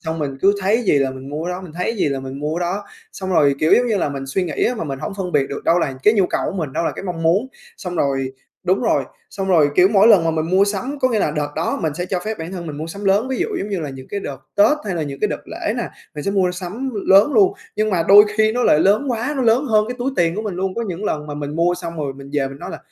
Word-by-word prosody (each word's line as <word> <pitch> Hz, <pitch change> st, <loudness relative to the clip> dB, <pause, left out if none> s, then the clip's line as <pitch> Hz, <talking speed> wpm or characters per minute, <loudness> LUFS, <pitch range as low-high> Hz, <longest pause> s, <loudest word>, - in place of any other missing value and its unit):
xong 160 Hz, 0 st, -4 dB
mình 140 Hz, -3 st, -3 dB
cứ 200 Hz, +1 st, +5 dB
thấy 215 Hz, +6 st, +2 dB
gì 150 Hz, -9 st, +3 dB
là 135 Hz, -1 st, +1 dB
mình 130 Hz, +1 st, -9 dB
mua 155 Hz, +3 st, -4 dB
cái 180 Hz, -, -2 dB
đó, 180 Hz, -, -5 dB
mình 170 Hz, -4 st, -10 dB
thấy 180 Hz, +2 st, -3 dB
cái 230 Hz, -, -1 dB
gì 155 Hz, -, +1 dB
là 135 Hz, -1 st, -2 dB
mình 135 Hz, +1 st, -7 dB
mua 155 Hz, +3 st, -2 dB
đó. 180 Hz, +4 st, -2 dB, 0.3 s
Xong 190 Hz, -1 st, -5 dB
rồi, 145 Hz, -5 st, +4 dB
kiểu 155 Hz, -, +3 dB
giống 245 Hz, -, +3 dB
như 220 Hz, -3 st, +1 dB
là, 165 Hz, -, 0 dB
mình 135 Hz, -1 st, -5 dB
suy 180 Hz, +7 st, -1 dB
nghĩ 155 Hz, -5 st, -1 dB
á 250 Hz, -, +1 dB
mà 215 Hz, -, -4 dB
mình 135 Hz, -3 st, -4 dB
hổng 195 Hz, -, -5 dB
phân 185 Hz, -3 st, -4 dB
biệt 135 Hz, -, +2 dB
được 140 Hz, -, -6 dB
đâu 170 Hz, +2 st, +4 dB
là 135 Hz, -5 st, -1 dB
cái 210 Hz, -, +5 dB
nhu 195 Hz, -4 st, +3 dB
cầu -, -, -1 dB
của 195 Hz, -, -3 dB
mình, 155 Hz, -6 st, -3 dB
đâu -, -, -1 dB
là -, -, 0 dB
cái -, -, -8 dB
mong 170 Hz, -3 st, -4 dB
muốn. 185 Hz, +10 st, +2 dB, 0.3 s
Xong 180 Hz, -4 st, -6 dB
rồi 135 Hz, -2 st, 0 dB, 0.3 s
đúng 185 Hz, +2 st, +1 dB
rồi, -, -, +2 dB, 0.3 s
xong 195 Hz, -1 st, -4 dB
rồi, 160 Hz, -6 st, +5 dB
kiểu, 180 Hz, +3 st, +6 dB
mỗi 205 Hz, +1 st, +5 dB
lần 180 Hz, -7 st, +6 dB
mà 165 Hz, -, +2 dB
mình 160 Hz, -1 st, -1 dB
mua 190 Hz, +2 st, +5 dB
sắm, 250 Hz, +8 st, -3 dB
có 255 Hz, -, +3 dB
nghĩa 225 Hz, -3 st, 0 dB
là 155 Hz, -, +1 dB
đợt 150 Hz, -1 st, -2 dB
đó 160 Hz, -, -1 dB
mình 155 Hz, -2 st, -1 dB
sẽ 175 Hz, +2 st, -3 dB
cho 185 Hz, -1 st, -2 dB
phép 220 Hz, 0 st, -3 dB
bản 165 Hz, +3 st, -6 dB
thân 175 Hz, -3 st, -6 dB
mình 150 Hz, -2 st, -6 dB
mua 155 Hz, +2 st, -5 dB
sắm 200 Hz, +5 st, -8 dB
lớn, 205 Hz, +6 st, +2 dB
ví 265 Hz, -, -2 dB
dụ 370 Hz, -, +1 dB
giống 205 Hz, -, -4 dB
như 195 Hz, -3 st, -2 dB
là 150 Hz, -3 st, -4 dB
những 130 Hz, 0 st, -10 dB
cái 200 Hz, -, -3 dB
đợt -, -, -5 dB, 0.2 s
Tết 215 Hz, +9 st, +5 dB
hay 195 Hz, -4 st, -2 dB
là 165 Hz, -, -1 dB
những 140 Hz, -2 st, -6 dB
cái -, -, +2 dB
đợt -, -, -4 dB
lễ -, -, -3 dB
nè, -, -, -2 dB, 0.3 s
mình 150 Hz, -, -6 dB
sẽ 200 Hz, -, 0 dB
mua 190 Hz, -2 st, +2 dB
sắm 195 Hz, +9 st, -5 dB, 0.2 s
lớn 200 Hz, +9 st, +6 dB
luôn. 390 Hz, -2 st, +5 dB, 0.2 s
Nhưng 215 Hz, 0 st, +1 dB
mà 180 Hz, -4 st, +1 dB
đôi 205 Hz, +1 st, +9 dB
khi 220 Hz, 0 st, +3 dB
nó 245 Hz, +2 st, 0 dB
lại 150 Hz, -, +4 dB
lớn 215 Hz, -, +3 dB
quá, 240 Hz, +5 st, -1 dB
nó 265 Hz, -, 0 dB
lớn 235 Hz, +4 st, +3 dB
hơn 215 Hz, -4 st, +3 dB
cái 250 Hz, -, -3 dB
túi 255 Hz, +3 st, -1 dB
tiền 170 Hz, -1 st, +2 dB
của 215 Hz, -, -3 dB
mình 210 Hz, -5 st, -4 dB
luôn, 190 Hz, +1 st, -2 dB
có 235 Hz, -, -2 dB
những 195 Hz, -1 st, -5 dB
lần 150 Hz, -6 st, -2 dB
mà 145 Hz, -, -6 dB
mình 145 Hz, +1 st, -5 dB
mua 175 Hz, +1 st, +2 dB
xong 170 Hz, -2 st, -7 dB
rồi, 145 Hz, -3 st, -2 dB
mình 140 Hz, 0 st, -11 dB
về 140 Hz, -2 st, 0 dB
mình 135 Hz, +1 st, -10 dB
nói -, -, -7 dB
là -, -, -7 dB
180 Hz, 330 wpm, -20 LUFS, 150-210 Hz, 0.3 s, đôi